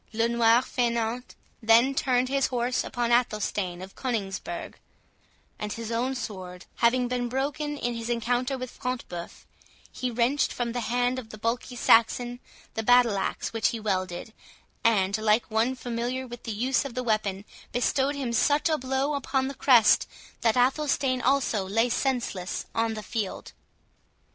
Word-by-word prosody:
"Le 230 Hz, +1 st, +2 dB
Noir 235 Hz, +1 st, +4 dB
Faineant" 235 Hz, -1 st, -1 dB, 0.3 s
then 230 Hz, +4 st, +5 dB
turned 255 Hz, -3 st, +1 dB
his 275 Hz, +1 st, +1 dB
horse 245 Hz, 0 st, 0 dB
upon 240 Hz, -1 st, -2 dB
Athelstane 210 Hz, -6 st, 0 dB
of 190 Hz, -, -10 dB
Coningsburgh; 195 Hz, -8 st, -4 dB, 0.9 s
and 210 Hz, 0 st, -3 dB
his 230 Hz, 0 st, -6 dB
own 250 Hz, +3 st, 0 dB
sword 185 Hz, -6 st, -7 dB
having 245 Hz, +1 st, +3 dB
been 245 Hz, -1 st, -2 dB
broken 290 Hz, +3 st, -2 dB
in 240 Hz, -3 st, -2 dB
his 230 Hz, 0 st, -5 dB
encounter 245 Hz, +3 st, 0 dB
with 255 Hz, -1 st, -6 dB
Front 250 Hz, -1 st, -4 dB
de 175 Hz, -, -6 dB
Bœuf, 170 Hz, 0 st, -8 dB, 0.5 s
he 255 Hz, -, -3 dB
wrenched 245 Hz, +4 st, +1 dB
from 240 Hz, -1 st, -2 dB
the 245 Hz, -, -2 dB
hand 245 Hz, +1 st, +1 dB
of 225 Hz, -4 st, -10 dB
the 215 Hz, -, -9 dB
bulky 235 Hz, +3 st, -2 dB
Saxon 240 Hz, +1 st, +3 dB, 0.3 s
the 225 Hz, -, -2 dB
battle 245 Hz, -1 st, +5 dB
axe 195 Hz, -, -3 dB
which 225 Hz, -2 st, +2 dB
he 230 Hz, -, -2 dB
wielded, 185 Hz, -1 st, -2 dB, 0.5 s
and, 200 Hz, -4 st, +3 dB
like 215 Hz, +2 st, +2 dB
one 230 Hz, +4 st, +1 dB
familiar 245 Hz, +1 st, -3 dB
with 240 Hz, -1 st, -10 dB
the 225 Hz, -, -3 dB
use 245 Hz, +6 st, +1 dB
of 275 Hz, -4 st, -7 dB
the 255 Hz, -, -2 dB
weapon, 210 Hz, -4 st, -1 dB, 0.3 s
bestowed 265 Hz, +3 st, +1 dB
him 260 Hz, -4 st, -3 dB
such 290 Hz, +7 st, +3 dB
a 310 Hz, -1 st, +1 dB
blow 265 Hz, +3 st, -1 dB
upon 265 Hz, -1 st, 0 dB
the -, -, -5 dB
crest, 250 Hz, -5 st, +5 dB, 0.3 s
that 225 Hz, 0 st, +2 dB
Athelstane 265 Hz, 0 st, +2 dB
also 255 Hz, -6 st, +2 dB
lay 225 Hz, +4 st, +2 dB
senseless 235 Hz, -8 st, -1 dB
on 225 Hz, -1 st, 0 dB
the 215 Hz, -, -6 dB
field. 210 Hz, -1 st, -4 dB
240 Hz, 165 wpm, -27 LUFS, 220-255 Hz, 0.9 s, then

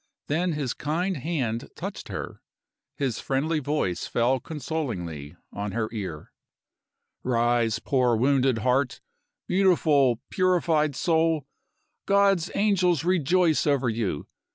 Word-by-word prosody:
Then 170 Hz, +4 st, 0 dB
his 140 Hz, -5 st, -2 dB
kind 170 Hz, +5 st, -2 dB
hand 130 Hz, -6 st, -2 dB
touched -, -, -6 dB
her; -, -, -6 dB, 0.6 s
his 130 Hz, -6 st, -1 dB
friendly 150 Hz, +4 st, 0 dB
voice 145 Hz, -, -1 dB
fell 125 Hz, +3 st, +1 dB
consolingly 115 Hz, -, -5 dB, 0.2 s
on 100 Hz, -1 st, -4 dB
her 110 Hz, 0 st, -1 dB
ear. 95 Hz, -9 st, -6 dB, 0.9 s
"Rise, 120 Hz, -2 st, +1 dB
poor 125 Hz, -4 st, +1 dB
wounded 130 Hz, +1 st, +2 dB
heart! 130 Hz, +1 st, +1 dB, 0.5 s
Beautiful, 155 Hz, -, +3 dB
purified 165 Hz, -5 st, +2 dB
soul, 160 Hz, -3 st, +1 dB, 0.6 s
God's 195 Hz, -3 st, +3 dB
angels 185 Hz, -7 st, +2 dB
rejoice 175 Hz, -2 st, +2 dB
over 135 Hz, -4 st, +2 dB
you! 110 Hz, -10 st, -2 dB
140 Hz, 105 wpm, -26 LUFS, 120-165 Hz, 0.9 s, Beautiful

